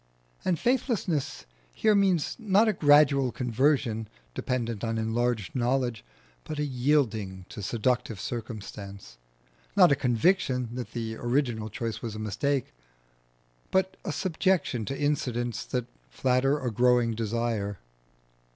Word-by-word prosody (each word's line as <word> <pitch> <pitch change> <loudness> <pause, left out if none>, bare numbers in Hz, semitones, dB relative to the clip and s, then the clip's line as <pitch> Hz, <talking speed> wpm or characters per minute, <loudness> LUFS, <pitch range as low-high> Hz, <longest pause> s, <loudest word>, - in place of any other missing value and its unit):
And 175 - +1
faithlessness 220 - 0 0.3
here 215 - +2
means 190 -6 +2
not 215 0 +3
a 215 - +3
gradual 145 -4 +5
conversion 125 -2 +1 0.3
dependent 115 - -2
on 115 -1 -1
enlarged 115 -2 -1
knowledge, 125 -2 0 0.4
but 155 - -6
a 150 - 0
yielding 120 -9 0
to - - -7
seductive 115 +1 -1
circumstance; 100 - -7 0.6
not 180 -6 +7
a - - +5
conviction 125 - +1
that 125 -1 -6
the 115 -2 -4
original 120 -3 0
choice 115 +1 -4
was 115 -2 -5
a - - -5
mistake, 110 - -1 1.0
but 190 0 +1
a 180 - -3
subjection 160 - 0
to 135 - -4
incidents 125 -5 -1
that 125 -2 -2 0.2
flatter 130 - +2
a 130 -4 -2
growing 120 0 +3
desire. 110 -2 -2
125 Hz, 125 wpm, -28 LUFS, 115-145 Hz, 1.0 s, not